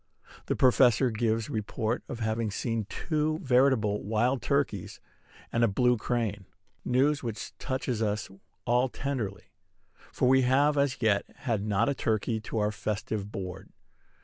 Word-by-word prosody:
The - - 0
Professor 125 -1 +4
gives 110 0 0
report 110 +1 -2
of 120 -4 -5
having 110 0 0
seen 115 0 -2
two 155 -1 -1
veritable 125 - +2
wild 120 +5 +1
turkeys 140 -10 -1 0.5
and 115 - +2
a - - +6
blue 125 +4 +3
crane, 110 -4 -2 0.4
news 140 +4 +2
which 115 -4 -5
touches 130 -4 -2
us 105 0 -1 0.4
all 125 +1 +2
tenderly; 115 -8 -4 0.6
for - - +1
we 130 +1 +5
have 140 +4 +3
as 140 -4 0
yet 105 -3 +3 0.2
had 115 -6 0
not 105 +1 +1
a 140 - +2
turkey 110 -2 -1
to 110 - -5
our 105 0 +1
festive 105 0 -3
board. 95 0 -6
115 Hz, 145 wpm, -28 LUFS, 105-130 Hz, 0.6 s, a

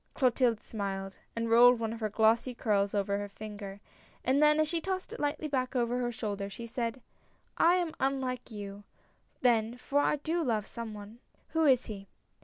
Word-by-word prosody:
Clotilde 245 -4 +2
smiled, 195 -2 -4 0.2
and 230 0 -1
rolled 240 +1 +7
one 225 -1 -2
of 230 - -7
her 215 -1 -1
glossy 225 +4 +2
curls 205 -4 +1
over 200 0 0
her 205 0 -5
finger, 205 -1 -8 0.5
and 265 +3 +3
then 300 0 +5
as 310 - +3
she 330 +1 -1
tossed 375 +1 -3
it - - -7
lightly 290 +1 -1
back 260 -2 -1
over 245 0 +1
her 240 -1 -1
shoulder, 205 -3 -4
she 230 +4 -8
said: 235 +1 -3 0.3
" - - -39
I 345 +2 +6
am 345 -3 0
unlike 260 -2 -1
you, 205 -2 -7 0.6
then, 235 -1 +2
for 280 +3 0
I 290 - +3
do 320 +4 -1
love 220 -6 0
some 225 -2 -6
one." 210 +3 -10 0.3
"Who 320 0 +2
is 260 -3 +4
he?" 200 -2 -7
235 Hz, 195 wpm, -31 LUFS, 210-265 Hz, 0.6 s, rolled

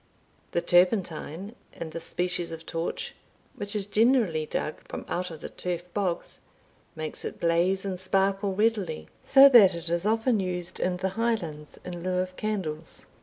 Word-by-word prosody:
The 170 - +2
turpentine 180 +1 +1 0.2
in 165 -1 -7
this 165 0 -6
species 180 -1 -2
of 165 0 -8
torch 165 +1 -4 0.4
(which 205 +1 -4
is 205 -2 0
generally 210 - +2
dug 155 - -3
from - - -6
out 180 +1 -2
the - - -6
turf 175 -1 -4
bogs) 190 -4 -2 0.6
makes 155 -1 -5
it - - -6
blaze 175 +3 +2
and 185 -2 -3
sparkle 195 +1 +1
readily, 205 - 0
so 275 0 +8
that 205 -8 +8
it 170 0 -4
is 170 +1 0
often 225 +2 +2
used 180 -2 -4
in 180 0 0
the 190 +1 -1
Highlands 185 -9 -3
in 175 -1 -6
lieu 185 +1 -1
of 185 0 -2
candles. 175 -8 -4
185 Hz, 160 wpm, -27 LUFS, 170-205 Hz, 0.6 s, so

